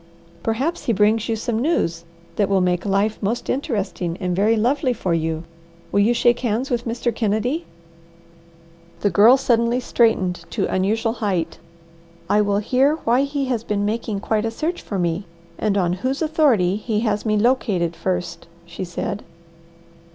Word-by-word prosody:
"Perhaps 260 Hz, -, -1 dB
he 235 Hz, -, +2 dB
brings 215 Hz, +2 st, +2 dB
you 225 Hz, -, +1 dB
some 225 Hz, 0 st, -2 dB
news 170 Hz, -, 0 dB, 0.3 s
that 205 Hz, -2 st, +1 dB
will 195 Hz, -1 st, +3 dB
make 180 Hz, +1 st, 0 dB
life 200 Hz, +2 st, +1 dB
most 225 Hz, +4 st, -1 dB
interesting 200 Hz, -, -2 dB
and 180 Hz, -2 st, -1 dB
very 210 Hz, +4 st, +3 dB
lovely 250 Hz, +4 st, +1 dB
for 185 Hz, -7 st, -2 dB
you. 160 Hz, 0 st, -1 dB, 0.5 s
Will 200 Hz, -, +2 dB
you 210 Hz, +4 st, +4 dB
shake 240 Hz, 0 st, +3 dB
hands 240 Hz, +3 st, -1 dB
with 240 Hz, -1 st, -1 dB
Mr. 235 Hz, +1 st, -1 dB
Kennedy?" 230 Hz, +9 st, -1 dB, 1.3 s
The 205 Hz, -, +2 dB
Girl 230 Hz, +6 st, +7 dB
suddenly 235 Hz, -2 st, +2 dB
straightened 190 Hz, -8 st, +1 dB
to -, -, -1 dB
unusual 220 Hz, +4 st, 0 dB
height. 200 Hz, -8 st, -2 dB, 0.7 s
"I 210 Hz, -, +3 dB
will 200 Hz, -1 st, +1 dB
hear 260 Hz, +8 st, +2 dB
why 240 Hz, +3 st, +3 dB
he 280 Hz, -1 st, -2 dB
has 245 Hz, -4 st, -1 dB
been 205 Hz, -2 st, -1 dB
making 215 Hz, -1 st, -2 dB
'quite 215 Hz, 0 st, 0 dB
a 225 Hz, -, 0 dB
search 320 Hz, +10 st, -3 dB
for 200 Hz, -, -4 dB
me,' 175 Hz, +2 st, -1 dB, 0.3 s
and 205 Hz, -2 st, +1 dB
on 175 Hz, -2 st, +1 dB
whose 265 Hz, +6 st, -1 dB
authority 265 Hz, -, +2 dB
he 215 Hz, 0 st, -1 dB
has 210 Hz, -3 st, 0 dB
me 215 Hz, -1 st, +1 dB
'located,' 205 Hz, -8 st, +1 dB
first," 175 Hz, -2 st, -3 dB, 0.2 s
she 170 Hz, +2 st, -7 dB
said. 185 Hz, +3 st, -4 dB
215 Hz, 165 wpm, -21 LUFS, 195-240 Hz, 1.3 s, Girl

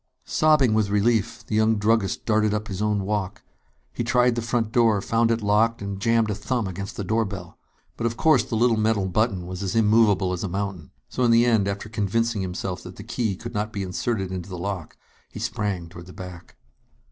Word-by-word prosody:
Sobbing 150 Hz, -7 st, +3 dB
with 110 Hz, -2 st, +2 dB
relief, 105 Hz, +1 st, +1 dB
the -, -, -6 dB
young 110 Hz, +1 st, +3 dB
druggist 105 Hz, -1 st, +1 dB
darted 110 Hz, -1 st, +2 dB
up 105 Hz, 0 st, -4 dB
his 95 Hz, 0 st, -4 dB
own 105 Hz, -2 st, +1 dB
walk. 100 Hz, -1 st, -3 dB, 0.5 s
He -, -, -2 dB
tried 125 Hz, +1 st, +3 dB
the 120 Hz, -, -2 dB
front 115 Hz, -1 st, -1 dB
door, 115 Hz, -3 st, +3 dB
found 115 Hz, +3 st, +1 dB
it 115 Hz, -1 st, 0 dB
locked, 110 Hz, +3 st, +2 dB
and 100 Hz, -1 st, -5 dB
jammed 115 Hz, 0 st, +2 dB
a -, -, 0 dB
thumb 115 Hz, +3 st, -2 dB
against 95 Hz, +2 st, -6 dB
the 105 Hz, -, -2 dB
doorbell. 100 Hz, -4 st, -2 dB, 0.4 s
But 115 Hz, -, 0 dB
of 115 Hz, 0 st, -4 dB
course 155 Hz, +4 st, +4 dB
the 115 Hz, -, -4 dB
little 115 Hz, 0 st, +3 dB
metal 110 Hz, -2 st, +1 dB
button 95 Hz, -1 st, 0 dB
was 90 Hz, +1 st, -6 dB
as 95 Hz, 0 st, -2 dB
immovable 105 Hz, -4 st, +3 dB
as 90 Hz, -, -4 dB
a 100 Hz, -, -2 dB
mountain. 95 Hz, -5 st, -4 dB, 0.2 s
So -, -, -5 dB
in 120 Hz, -, +4 dB
the 115 Hz, +1 st, +5 dB
end, 110 Hz, -5 st, +3 dB
after 100 Hz, +1 st, -3 dB
convincing 110 Hz, +1 st, 0 dB
himself 90 Hz, 0 st, -4 dB
that -, -, -10 dB
the -, -, -9 dB
key 110 Hz, -5 st, -2 dB
could 115 Hz, +5 st, -8 dB
not 105 Hz, 0 st, -2 dB
be 100 Hz, -2 st, -3 dB
inserted 95 Hz, +1 st, -2 dB
into 90 Hz, 0 st, -5 dB
the 90 Hz, -, -6 dB
lock, 90 Hz, -2 st, -5 dB, 0.3 s
he -, -, -11 dB
sprang 100 Hz, -5 st, -2 dB
toward 85 Hz, +1 st, -11 dB
the 90 Hz, -, -11 dB
back. 90 Hz, -2 st, -10 dB
105 Hz, 215 wpm, -24 LUFS, 95-115 Hz, 0.5 s, the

